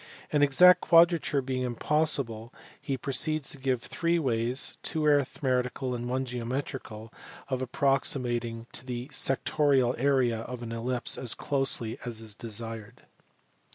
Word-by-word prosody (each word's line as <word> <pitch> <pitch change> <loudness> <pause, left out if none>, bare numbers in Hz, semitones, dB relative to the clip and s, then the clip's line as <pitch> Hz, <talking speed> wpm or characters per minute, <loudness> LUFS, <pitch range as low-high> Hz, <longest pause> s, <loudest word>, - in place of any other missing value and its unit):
An 150 - +2
exact 180 +6 +6
quadrature 165 -4 +4
being 130 0 -2
impossible, 125 -2 0 0.3
he 135 - -3
proceeds 145 +3 0
to 140 - -4
give 130 -2 -1
three 170 0 0
ways, 125 -3 0
two 155 -2 -1
arithmetical 130 -3 0
and 120 0 -4
one 130 +1 -1
geometrical, 120 -2 -5 0.4
of 130 -1 -2
approximating 125 -3 0
to - - -4
the 125 +1 -5
sectorial 135 -2 +1
area 130 -4 +2
of 120 +1 -7
an 115 - -6
ellipse 120 +2 -2
as 120 -2 0
closely 135 -5 0
as 120 -2 -5
is 110 -2 -6
desired. 115 0 -6
130 Hz, 130 wpm, -28 LUFS, 120-140 Hz, 0.4 s, exact